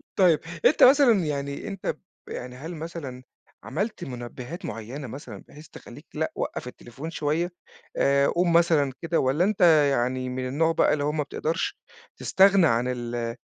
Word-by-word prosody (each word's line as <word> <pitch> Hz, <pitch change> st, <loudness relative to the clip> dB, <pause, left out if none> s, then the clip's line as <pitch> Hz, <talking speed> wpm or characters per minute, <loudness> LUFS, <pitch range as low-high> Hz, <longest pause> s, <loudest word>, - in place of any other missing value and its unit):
طيّب، 175 Hz, -5 st, +4 dB, 0.3 s
أنت 300 Hz, -, +5 dB
مثلًا 250 Hz, -, +6 dB
يعني، 140 Hz, +1 st, -4 dB
أنت 195 Hz, -2 st, -6 dB, 0.4 s
ب -, -, -12 dB
يعني 125 Hz, 0 st, -7 dB
هل 160 Hz, +6 st, -7 dB
مثلًا 155 Hz, -6 st, -7 dB, 0.4 s
عملت 200 Hz, -, -3 dB
مُنبهات 125 Hz, +4 st, -7 dB
معينة 120 Hz, +6 st, -6 dB
مثلًا، 135 Hz, +5 st, -9 dB
بحيث 150 Hz, +2 st, -14 dB
تخلّيك 145 Hz, +6 st, -13 dB
لأ، 160 Hz, +1 st, -2 dB
وقف -, -, -4 dB
التليفون 125 Hz, +5 st, -9 dB
شوية، 165 Hz, +3 st, -1 dB, 0.5 s
آآ، 140 Hz, 0 st, +3 dB
قوم 175 Hz, 0 st, +1 dB
مثلًا 165 Hz, -5 st, +3 dB
كده 165 Hz, 0 st, 0 dB
والّا 135 Hz, +7 st, +2 dB
أنت 205 Hz, 0 st, 0 dB, 0.3 s
يعني 130 Hz, 0 st, -1 dB
من 130 Hz, 0 st, -3 dB
النوع 160 Hz, +5 st, +1 dB
بقى -, -, +3 dB
اللي 145 Hz, -, -1 dB
هو 150 Hz, -, +1 dB
ما 150 Hz, -1 st, -1 dB
بتقدرش 165 Hz, -, -3 dB, 0.4 s
تستغنى 195 Hz, -2 st, +5 dB
عن 115 Hz, 0 st, +1 dB
ال 120 Hz, -2 st, -3 dB
150 Hz, 160 wpm, -25 LUFS, 130-170 Hz, 0.5 s, مثلًا